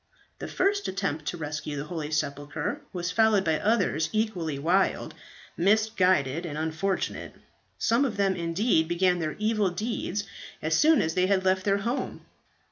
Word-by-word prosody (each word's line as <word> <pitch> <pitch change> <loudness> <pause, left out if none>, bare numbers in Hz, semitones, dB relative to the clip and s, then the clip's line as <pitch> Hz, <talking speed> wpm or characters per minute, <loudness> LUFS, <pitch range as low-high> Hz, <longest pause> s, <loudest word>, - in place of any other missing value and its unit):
"This - - -6
first 400 +2 +1
attempt 175 -6 -2
to 175 - -2
rescue 150 -1 -4
the 140 - -3
holy 155 -1 -5
sepulchre 145 -1 -3
was 180 -1 -3
followed 220 -1 +3
by 160 -2 +1
others 200 -8 +1
equally 185 -9 -1
wild, 175 +7 +1 0.4
misguided, 185 -7 +2
and 155 -4 -5
unfortunate. 160 +5 -2 0.4
Some 230 +4 +2
of 235 -7 -2
them 195 -1 +2
indeed 170 0 +1
began 180 +1 +2
their 155 -2 -2
evil 215 -2 +1
deeds 205 +1 -3 0.4
as 155 +1 0
soon 310 - +5
as 160 - -1
they 185 +1 +2
had 190 -1 +1
left 185 0 +2
their 200 -1 +3
home. 240 +4 -3
185 Hz, 155 wpm, -27 LUFS, 160-210 Hz, 0.4 s, soon